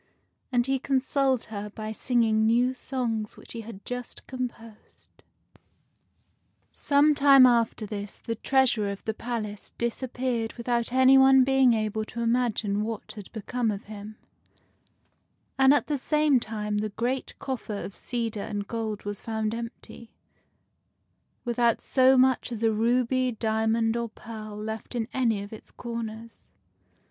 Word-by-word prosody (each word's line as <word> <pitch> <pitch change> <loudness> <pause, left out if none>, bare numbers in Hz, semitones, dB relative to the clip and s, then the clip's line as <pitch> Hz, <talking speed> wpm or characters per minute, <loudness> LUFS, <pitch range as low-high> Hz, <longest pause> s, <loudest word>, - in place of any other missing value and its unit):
And 240 -1 +2
he 270 0 0
consoled 265 -1 +1
her 205 0 -4
by 215 +1 -6
singing 220 -1 +2
new 240 +3 +3
songs 235 -5 -3
which - - -10
he 230 - -5
had 215 -3 -11
just 245 -1 -6
composed. 235 -4 -8 1.5
Some 290 +1 +3
time 275 -2 +7
after 235 -3 +2
this 205 -1 -6
the 230 - -4
Treasurer 240 -3 +2
of 200 0 -6
the 220 - -1
palace 215 -3 -5
disap 235 +2 -3
peared 240 -3 -1
without 235 -1 -1
any 260 +1 +6
one 265 0 +7
being 265 -2 +4
able 215 0 -1
to 235 +2 -6
imagine 230 -4 +1
what 220 0 -4
had 205 -3 -10
become 230 +2 -2
of 205 -1 -3
him; 210 0 -9 1.4
and 265 0 +7
at 290 - +3
the 290 -2 -2
same 300 -1 +3
time 210 -2 -3
the 215 +1 -2
great 240 +5 -3
coffer 235 -6 -4
of 200 - -8
cedar 230 -3 -3
and 205 -1 -4
gold 220 -3 -4
was 205 -1 -4
found 220 -1 -2
empty, 230 0 -8 1.4
without 235 -1 +2
so 260 0 +4
much 255 -1 +3
as 230 -1 -4
a 225 - +4
ruby, 245 +3 +1
diamond, 225 +1 +1
or 235 -1 -2
pearl 215 -1 -9
left 220 +3 -6
in 225 -2 -1
any 230 -6 +1
of 205 - -10
its 220 - -11
corners. 230 -1 -7
230 Hz, 145 wpm, -27 LUFS, 215-255 Hz, 1.5 s, time